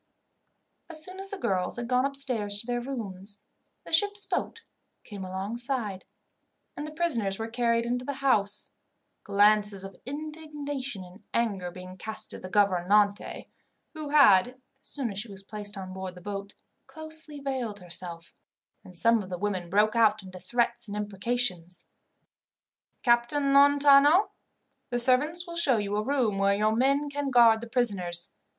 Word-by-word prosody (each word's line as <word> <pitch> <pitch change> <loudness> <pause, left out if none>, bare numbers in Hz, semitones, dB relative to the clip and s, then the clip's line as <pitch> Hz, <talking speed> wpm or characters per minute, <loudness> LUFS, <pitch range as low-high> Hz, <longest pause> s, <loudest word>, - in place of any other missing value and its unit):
As 310 -2 +2
soon 370 +3 -5
as 390 0 -5
the 400 - -5
girls 185 - -1
had 240 -1 -4
gone 250 +1 +2
upstairs 250 -7 +1
to 205 - -2
their 240 0 -2
rooms, 205 -6 -6 0.4
the - - -8
ship's 405 +4 +4
boat 455 - -3 0.4
came 200 -3 -8
alongside, 205 +2 -4 0.7
and 295 - -5
the - - -8
prisoners 240 - 0
were 225 - -4
carried 235 0 0
into 245 +1 -2
the 280 - -3
house, 210 -7 0 0.5
glances 205 -1 +3
of 195 0 -9
indignation 290 -6 -5
and 185 +3 -15
anger 200 -6 0
being 185 +1 -10
cast 220 +3 -3
at - - -8
the 185 - -7
gouvernante, 200 +1 +2 0.5
who 310 -2 -6
had, 245 -10 +6 0.3
as - - -12
soon 265 -6 -3
as 195 - -4
she 225 - -4
was 195 -1 -10
placed 205 0 -6
on 185 -1 -7
board 190 -1 -6
the - - -11
boat, 200 +1 -6 0.3
closely 315 -1 -2
veiled 260 -6 -3
herself; 175 -2 -8 0.5
and 180 -1 -7
some 230 +5 +4
of 190 - -9
the 180 - -4
women 185 -3 -3
broke 210 +4 +2
out 215 -2 +3
into 185 -1 -10
threats 235 +4 -1
and 205 0 -5
imprecations. 205 -4 -1 1.1
"Captain 260 +4 +2
Lontano, 285 +5 +6 0.6
the 245 - -1
servants 290 +8 +2
will 340 -1 -8
show 285 -8 +3
you 205 -1 -2
a 210 - +1
room 240 -6 0
where 200 0 +3
your 215 +2 +1
men 275 +4 +2
can 285 -1 -3
guard 230 -3 +5
the 235 - -7
prisoners. 190 -9 0
225 Hz, 160 wpm, -27 LUFS, 195-275 Hz, 1.1 s, had